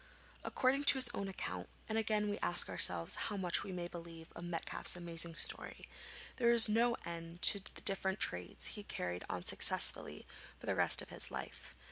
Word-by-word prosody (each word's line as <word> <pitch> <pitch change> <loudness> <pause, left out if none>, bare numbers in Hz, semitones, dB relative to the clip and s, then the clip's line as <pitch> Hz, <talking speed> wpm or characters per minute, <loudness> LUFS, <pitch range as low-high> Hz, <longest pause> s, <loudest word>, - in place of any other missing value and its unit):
According 275 +2 0
to 280 - +9
his 255 -2 +5
own 200 - -4
account 90 - -5 0.2
and 220 - -3
again 215 -1 0
we 205 - -3
ask 90 - -2
ourselves 85 0 +2 0.2
how 205 - -4
much 180 -3 0
we 200 - -7
may 175 -1 -4
believe 165 -1 -10
of 175 - -8
Metcalfe's 175 0 -2
amazing 170 -1 0
story - - -3 0.5
there 235 -2 +3
was 235 -1 +8
no 235 +2 +2
end 170 0 -7
to 200 - +7
the 195 - -10
different 190 0 -2
trades 90 0 -2
he 210 - -6
carried 90 - -5
on 90 -1 -5
successfully - - +1 0.3
for - - -12
the - - 0
rest - - +4
of - - -13
his - - -1
life. - - -8
180 Hz, 185 wpm, -35 LUFS, 165-215 Hz, 0.5 s, to